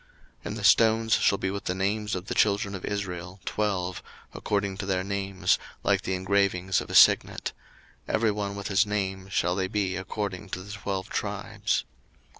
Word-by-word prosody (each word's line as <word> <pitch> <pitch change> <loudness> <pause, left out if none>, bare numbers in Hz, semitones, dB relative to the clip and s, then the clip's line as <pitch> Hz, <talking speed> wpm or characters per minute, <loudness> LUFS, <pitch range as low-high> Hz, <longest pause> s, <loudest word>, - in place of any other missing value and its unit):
02:028:021 - - -27
And - - -4
the - - -6
stones 110 -1 +5
shall 100 - +4
be 95 - -2
with 100 0 -5
the 90 - -1
names 105 +2 -1
of 90 0 -5
the - - -3
children 100 0 +2
of 95 - -6
Israel, 95 -2 -4
twelve, 95 -4 -1 0.3
according 100 -2 -1
to 95 - -4
their 95 -1 0
names, 95 -2 0 0.2
like - - +2
the 95 - -2
engravings 95 -1 +1
of - - -9
a - - -3
signet; - - +5 0.6
every 110 -1 +2
one 100 -1 -3
with 100 - -5
his 100 +1 +4
name 95 -2 -2
shall 90 -2 +1
they 95 -1 0
be 95 -2 -1
according 95 0 -4
to 95 0 -5
the 100 - -10
twelve 100 -1 -4
tribes. - - -1
100 Hz, 185 wpm, -27 LUFS, 95-100 Hz, 0.6 s, stones